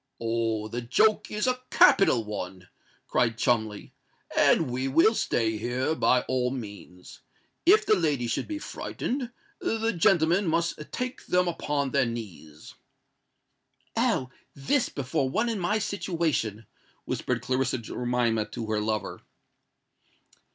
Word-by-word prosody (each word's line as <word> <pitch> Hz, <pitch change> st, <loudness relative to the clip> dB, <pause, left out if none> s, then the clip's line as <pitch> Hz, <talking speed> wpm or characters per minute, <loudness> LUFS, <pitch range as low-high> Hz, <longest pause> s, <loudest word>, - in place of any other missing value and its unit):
"Oh! 115 Hz, -2 st, -1 dB
the 120 Hz, +3 st, -4 dB
joke 215 Hz, -, +2 dB
is 210 Hz, 0 st, -1 dB
a 255 Hz, 0 st, 0 dB
capital 130 Hz, -, +5 dB
one!" 95 Hz, -3 st, -7 dB, 0.4 s
cried 115 Hz, -2 st, +1 dB
Cholmondeley; 110 Hz, -4 st, 0 dB, 0.4 s
"and -, -, +4 dB
we 130 Hz, +2 st, -1 dB
will 165 Hz, +11 st, +4 dB
stay 110 Hz, -, 0 dB
here 120 Hz, +6 st, -1 dB
by 125 Hz, -5 st, +3 dB
all 125 Hz, -1 st, 0 dB
means. 100 Hz, -7 st, -9 dB, 0.5 s
If 415 Hz, +4 st, +6 dB
the -, -, +4 dB
ladies 145 Hz, -, 0 dB
should -, -, -2 dB
be 310 Hz, -, -4 dB
frightened, 260 Hz, -4 st, -4 dB, 0.3 s
the 225 Hz, +1 st, -1 dB
gentlemen 175 Hz, +1 st, +3 dB
must 165 Hz, 0 st, 0 dB
take 250 Hz, 0 st, -5 dB
them 180 Hz, 0 st, +2 dB
upon 145 Hz, -5 st, -1 dB
their 125 Hz, -, +2 dB
knees." 95 Hz, -10 st, -8 dB, 1.2 s
"Oh! 130 Hz, -1 st, +1 dB, 0.2 s
this 230 Hz, -, +1 dB
before 140 Hz, 0 st, -1 dB
one 220 Hz, -, 0 dB
in 225 Hz, -3 st, -2 dB
my 200 Hz, +4 st, +1 dB
situation!" 165 Hz, -, -2 dB, 0.4 s
whispered -, -, -2 dB
Clarissa 130 Hz, 0 st, 0 dB
Jemima 120 Hz, -1 st, -1 dB
to 115 Hz, -, -6 dB
her 105 Hz, -1 st, 0 dB
lover. 110 Hz, 0 st, -3 dB
130 Hz, 130 wpm, -27 LUFS, 115-180 Hz, 1.2 s, If